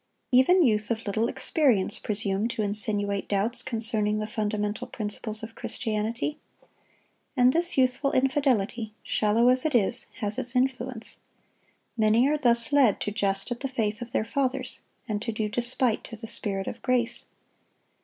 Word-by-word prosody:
Even 300 +9 +5
youth 215 -5 +2
of 230 -1 -2
little 215 +3 0
experience 245 -9 +1
presume 205 0 -1
to 230 -2 -2
insinuate 205 -1 -1
doubts 220 +5 +1
concerning 220 -4 +1
the 215 - -2
fundamental 210 -1 -2
principles 215 0 -4
of 225 0 -7
Christianity. 225 +8 -2 1.0
And 250 +1 +5
this 345 0 +1
youthful 260 +2 +2
infidelity, 250 -6 +1
shallow 220 +3 +2
as 255 0 +3
it 310 -4 0
is, 235 +2 +2
has 210 -3 -2
its 240 +1 -5
influence. 250 -2 -2 0.8
Many 225 +3 +4
are 300 +1 +2
thus 235 +1 +2
led 265 -8 +4
to 210 - -2
jest 200 +1 -1
at 240 - -3
the 275 - -2
faith 225 -4 -2
of 240 0 -7
their 215 - 0
fathers, 265 +2 -2 0.3
and 210 -2 -2
to 230 - -2
do 215 -1 -2
despite 240 +1 0
to 225 - -8
the 225 +1 -9
Spirit 195 -3 -2
of 235 - -6
grace. 240 -2 0
230 Hz, 155 wpm, -27 LUFS, 210-255 Hz, 1.0 s, Even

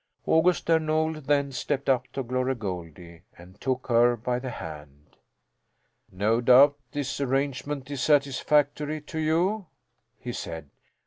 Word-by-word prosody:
August 170 +2 +3
Där 165 -1 +4
Nol 155 0 0
then 140 0 +1
stepped 140 +2 -3
up 130 -2 +2
to 135 - -3
Glory 130 +2 -1
Goldie 85 -5 -7 0.2
and 90 +3 -15
took 130 -1 -2
her 120 0 +4
by 125 +2 -2
the 130 0 -5
hand. 75 - -10 0.9
"No 105 +5 +1
doubt 130 +4 +6 0.2
this 145 -1 -3
arrangement 140 +1 -2
is 140 -3 -3
satisfactory 145 +1 +1
to 160 +2 -6
you," 175 +6 0 0.5
he - - -6
said. 80 -3 -7
135 Hz, 135 wpm, -26 LUFS, 115-150 Hz, 0.9 s, doubt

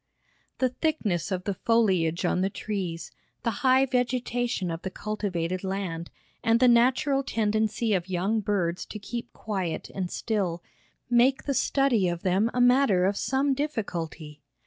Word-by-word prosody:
The 255 - +2
thickness 240 - -1
of 185 -1 -2
the 200 - -1
foliage 185 -6 +1
on 180 - +1
the 190 - +1
trees, 190 -5 -4 0.3
the 230 - +1
high 260 0 +5
vegetation 245 -6 -1
of 165 +1 -5
the 190 - -4
cultivated 185 -4 -3
land, 190 -4 -3 0.3
and 230 0 +3
the 255 - +5
natural 255 +3 +4
tendency 220 -1 0
of 185 -1 -1
young 190 +5 0
birds 185 -4 -1
to - - -7
keep 235 +3 -6
quiet 190 -6 -4
and 185 -2 -3
still, 185 -7 -2 0.4
make 245 +2 +3
the 280 - -1
study 265 -8 +2
of 175 0 -4
them 195 +4 +2
a 250 - -2
matter 245 -7 +4
of 200 +2 +1
some 270 +5 +1
difficulty. 170 - -4
210 Hz, 150 wpm, -27 LUFS, 180-245 Hz, 0.4 s, high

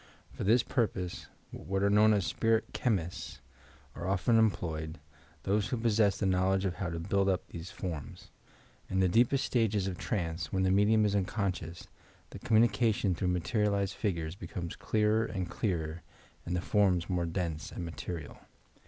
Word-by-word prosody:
For - - -6
this 115 +5 +4
purpose 95 -8 -2 0.2
what 95 +1 -3
are 100 - +4
known 105 +1 +6
as 100 -4 +2
"spirit 115 -1 0
chemists" 95 -6 -2 0.5
are 85 - -5
often 100 +5 +3
employed, 80 -7 -1 0.4
those 100 +1 +1
who 125 - -2
possess 110 -3 +2
the 100 - -1
knowledge 95 +1 +2
of 95 - 0
how 90 - -2
to 85 0 -4
build 100 +3 +1
up 95 -1 0
these 85 +2 -7
forms. 80 -7 -7 0.6
In 95 - 0
the 95 - +4
deepest 120 +8 +3
stages 110 -5 +1
of 95 -2 -4
trance, 85 -7 -2
when 95 0 +1
the 95 - +3
medium 105 +2 +4
is 100 -1 +1
unconscious, 95 -4 -2 0.4
the - - -8
communication 110 -3 +3
through 90 +2 -2
materialized 100 +2 0
figures 85 -7 -2
becomes 90 -4 -6
clearer 110 +1 +1
and 95 -6 -4
clearer 85 -5 -2 0.5
and 90 - -1
the 90 - 0
forms 90 -4 +2
more 90 -2 -1
dense 80 -2 -3
and 90 - -5
material. 85 -2 -6
95 Hz, 160 wpm, -31 LUFS, 85-105 Hz, 0.6 s, known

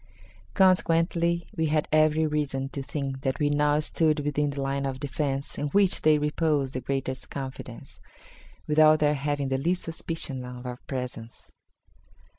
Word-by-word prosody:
Consequently, 170 -2 +2
we 160 0 +1
had 155 0 +1
every 155 0 +4
reason 145 -3 -1
to 140 - -5
think 135 -1 -4
that 135 -2 -1
we 145 -1 +1
now 145 0 +2
stood 155 0 +1
within 145 0 0
the 140 0 -5
line 140 0 -1
of 135 -1 -3
defence, 140 0 -3
in 145 - -1
which 195 +4 +3
they 155 -1 +5
reposed 150 -2 0
the 130 - -3
greatest 135 -1 -3
confidence, 135 -2 -8 0.7
without 155 0 +5
their 150 -1 +2
having 145 -1 -2
the 135 0 0
least 175 +6 0
suspicion 160 -5 -5
of 125 0 -8
our 125 0 -5
presence. 125 -3 -6
145 Hz, 155 wpm, -27 LUFS, 135-155 Hz, 0.7 s, they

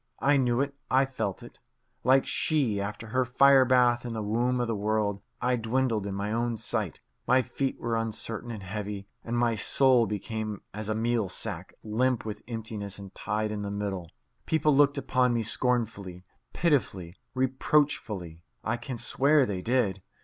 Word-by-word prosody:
I 145 +1 +3
knew 125 -1 +2
it; 140 0 -1 0.2
I 130 +1 +4
felt 110 -7 -4
it. - - -13 0.4
Like 130 +2 +4
She, 130 -11 +1
after 105 +3 -5
her 130 +3 +2
fire 135 +2 +5
bath 125 -1 +4
in 120 -1 -4
the 110 -1 -3
womb 120 +4 +1
of 120 - +1
the 115 - -1
world, 105 -1 0 0.2
I 125 0 +1
dwindled 115 -2 0
in 100 - -4
my 100 +2 -2
own 120 0 0
sight. - - -2 0.3
My 130 +1 +4
feet 135 +2 -3
were 115 -1 -1
uncertain 115 +1 -3
and 110 -4 -6
heavy, 100 0 -5 0.2
and 120 +1 -2
my 120 -1 +2
soul 125 +2 +4
became 105 +1 -4
as 105 +1 -5
a 110 - 0
meal 115 -2 0
sack, 90 -2 -5
limp 120 +3 0
with 105 -2 -5
emptiness 110 -4 -5
and 100 -2 -10
tied 105 +1 -2
in 105 -1 -3
the 100 - -3
middle. 100 -4 -3 0.4
People 155 -2 +3
looked 145 +1 +4
upon 125 -3 +2
me 115 - 0
scornfully, 110 -7 -1 0.3
pitifully, 100 - 0 0.2
reproachfully. 130 - 0 0.2
(I 120 +2 -1
can 120 +1 -6
swear 140 +4 +3
they 95 -5 -3
did.) 110 -5 +1
115 Hz, 170 wpm, -28 LUFS, 105-130 Hz, 0.4 s, fire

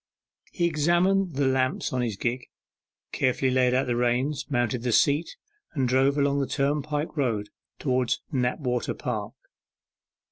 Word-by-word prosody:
He 175 - 0
examined 175 +3 +2
the 140 0 +1
lamps 130 -1 0
of 125 - 0
his 115 -4 -2
gig, 120 +3 -2 0.6
carefully 130 0 +1
laid 125 -1 +3
out 130 +1 +2
the 120 -2 -1
reins, 125 +5 0
mounted 120 -3 0
the 120 0 -1
seat 145 +7 +2 0.4
and 135 -5 0
drove 135 +3 +3
along 140 0 +2
the 135 - 0
turnpike 150 +2 -1
road 115 -8 -1 0.3
towards 125 -3 0
Knapwater 125 -1 -1
Park. - - -4
130 Hz, 140 wpm, -26 LUFS, 125-145 Hz, 0.6 s, laid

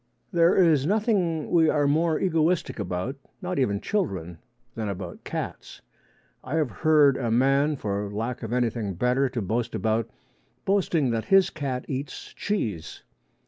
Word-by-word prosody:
There 170 -1 +4
is 155 -6 +4
nothing 195 -7 +1
we 165 -2 +5
are 145 -1 +2
more 155 +2 +2
egoistic 165 -5 +1
about 95 +7 -3 0.2
not 180 -3 -3
even 100 -7 +1
children 95 - -2 0.3
than 110 -2 -3
about 90 -3 -6
cats. - - -6 0.6
I 130 +4 -4
have 155 -6 +1
heard 150 -4 +4
a 120 -3 -2
man, 135 +5 +3
for 100 -4 -3
lack 115 +4 -3
of 115 -2 -5
anything 115 -5 -1
better 125 +7 +1
to 120 -3 -3
boast 115 +5 -2
about, 110 +1 0 0.6
boasting 175 -9 +2
that 115 -1 -1
his 195 -2 +4
cat 135 -4 -3
eats 135 0 -5
cheese. 110 - -3
135 Hz, 145 wpm, -26 LUFS, 110-160 Hz, 0.6 s, we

